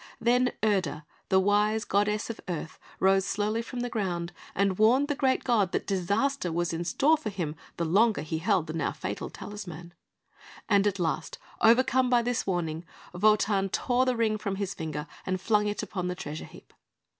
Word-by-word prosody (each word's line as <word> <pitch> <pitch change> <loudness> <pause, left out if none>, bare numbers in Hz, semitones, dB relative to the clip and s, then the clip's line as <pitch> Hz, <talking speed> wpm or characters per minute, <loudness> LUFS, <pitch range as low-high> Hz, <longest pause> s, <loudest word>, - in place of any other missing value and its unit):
Then 245 +2 +3
Erda, 180 -8 0 0.2
the 190 - +5
wise 210 +3 +2
goddess 210 +3 0
of 225 - -10
Earth, 165 -2 -5 0.2
rose 195 0 +4
slowly 205 +3 -1
from 245 +1 -6
the 245 - -1
ground, 180 -6 -2 0.2
and 195 0 +1
warned 255 +7 +4
the - - +2
great 265 -2 +1
god 210 -7 +2
that - - -1
disaster 200 +3 0
was 170 +1 -1
in 165 +1 -2
store 305 - +3
for 260 -8 -4
him 170 -7 -4 0.2
the 170 - -1
longer 210 +7 +3
he 160 +1 -3
held 185 -1 +1
the 155 - -6
now 160 -3 -1
fatal 100 +2 -5
talisman; 175 -5 -8 0.7
and 200 -2 +4
at 200 -1 0
last, 165 -4 -2 0.2
overcome 255 +2 +4
by 240 -1 +4
this 245 -3 -1
warning, 170 -3 -1 0.3
Wotan 200 0 +3
tore 250 +5 +1
the 255 - +2
Ring 215 -2 +1
from 200 -2 -2
his 200 -1 -3
finger, 155 -4 -5 0.2
and 185 0 -2
flung 210 +1 +2
it 205 - -2
upon 180 -2 -3
the 180 - -2
treasure 155 -3 -6
heap. - - -16
200 Hz, 185 wpm, -28 LUFS, 175-225 Hz, 0.7 s, the